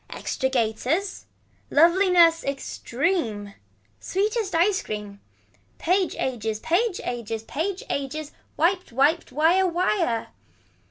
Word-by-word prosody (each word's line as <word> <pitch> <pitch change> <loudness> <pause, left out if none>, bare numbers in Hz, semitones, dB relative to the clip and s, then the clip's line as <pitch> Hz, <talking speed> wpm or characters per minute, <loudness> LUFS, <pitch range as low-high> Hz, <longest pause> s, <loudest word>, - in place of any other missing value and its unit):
Extra 265 - -2
gaiters. 260 - -1 0.4
Loveliness 340 0 +5
extreme. 260 - -2 0.5
Sweetest 415 0 -1
ice 375 +4 +3
cream. 205 -1 -7 0.6
Page 365 +1 +1
ages 225 -4 -2
page 360 - 0
ages 225 -2 -4
page 350 - -3
ages. 285 +2 -4 0.3
Wiped 360 +2 +1
Wiped 285 +7 +2
wire 330 +7 +3
wire. 345 - 0
320 Hz, 95 wpm, -24 LUFS, 245-365 Hz, 0.6 s, Loveliness